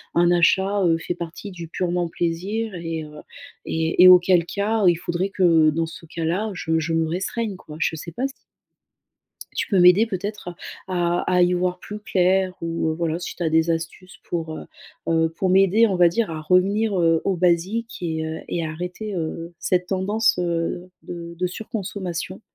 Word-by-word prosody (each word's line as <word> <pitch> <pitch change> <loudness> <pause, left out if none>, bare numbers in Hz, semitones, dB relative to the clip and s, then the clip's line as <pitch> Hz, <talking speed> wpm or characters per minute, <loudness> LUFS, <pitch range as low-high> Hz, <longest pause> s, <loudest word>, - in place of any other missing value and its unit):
un 175 0 +4
achat, 190 +3 +3
heu, 165 -1 +3
fait 175 +1 -4
partie 175 +4 -7
du 170 -2 -8
purement 175 -1 -1
plaisir 190 +7 -2
et 165 -2 -4
heu, 150 0 -12 0.5
et 160 +2 +2
et - - +10
auquel 180 -1 +6
cas, 205 +2 0
heu, - - +8
il - - -1
faudrait 175 +2 -2
que 165 -5 +4
dans 165 +2 -1
ce 165 0 -11
cas-là, 170 +7 -2
je 160 -2 -1
je 165 +1 -2
me 165 0 +1
restreigne, 195 +4 -3
quoi. 150 -4 -12
Je 165 - 0
sais 170 - -7
pas 260 +6 -1
si 275 - -11 1.2
tu - - -2
peux 195 - +2
m'aider 180 +5 +6
peut-être 200 -1 -5
à 175 - -8 0.6
à - - -1
à 180 - +5
y 175 +1 +3
voir 180 0 0
plus 210 +3 -8
clair 185 -1 +1
ou, 165 -1 -1
heu, - - -1
voilà, 165 0 -1
si 180 - -6
tu 175 - -5
as 160 - +1
des 160 +1 +3
astuces 165 +3 -5
pour, 160 -2 -4
heu - - -8 0.4
heu, 165 0 +3
pour 190 -1 0
m'aider, 195 +4 +5
on 190 -3 0
va 175 -1 +6
dire, 215 +1 -1
à 155 -1 -5
revenir, 195 +5 +2
heu, 165 -1 +3
aux 195 -2 +1
basiques 185 +7 0
et 160 -2 -2
heu 160 0 -4
et 170 -1 -2
à 155 - -3
arrêter, 180 +6 -5
heu, 165 0 -4
cette 180 0 0
tendance, 200 +3 +1
heu, 175 +1 -2
de 170 -1 -8
de 180 - +1
surconsommation. 185 -2 -5
175 Hz, 195 wpm, -23 LUFS, 165-190 Hz, 1.2 s, et